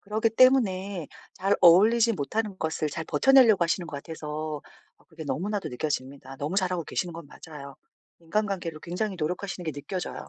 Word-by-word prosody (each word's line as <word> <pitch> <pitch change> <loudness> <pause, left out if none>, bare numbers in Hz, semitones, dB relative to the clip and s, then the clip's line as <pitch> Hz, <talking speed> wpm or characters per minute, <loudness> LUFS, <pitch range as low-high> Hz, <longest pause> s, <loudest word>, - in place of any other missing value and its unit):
그러기 220 +2 0
때문에 200 - +3 0.3
잘 195 +2 +1
어울리지 220 +7 +6
못하는 205 +6 -2
것을 160 -1 -1
잘 160 +3 -5
버텨내려고 250 -8 +5
하시는 170 +1 -1
것 145 - -7
같아서 155 -1 -5 0.4
아 - - -27
그게 160 -2 -9
너무나도 190 +9 -2
느껴집니다. 135 0 -4
너무 150 +8 -3
잘하고 180 -4 0
계시는 175 -2 -3
건 165 -2 -9
맞아요. 140 -2 -11 0.5
인간관계를 175 -2 -2
굉장히 190 +3 -3
노력하시는 180 +3 -3
게 160 - -2
느껴져요. 160 +5 -6
175 Hz, 415 characters per minute, -27 LUFS, 155-205 Hz, 0.5 s, 어울리지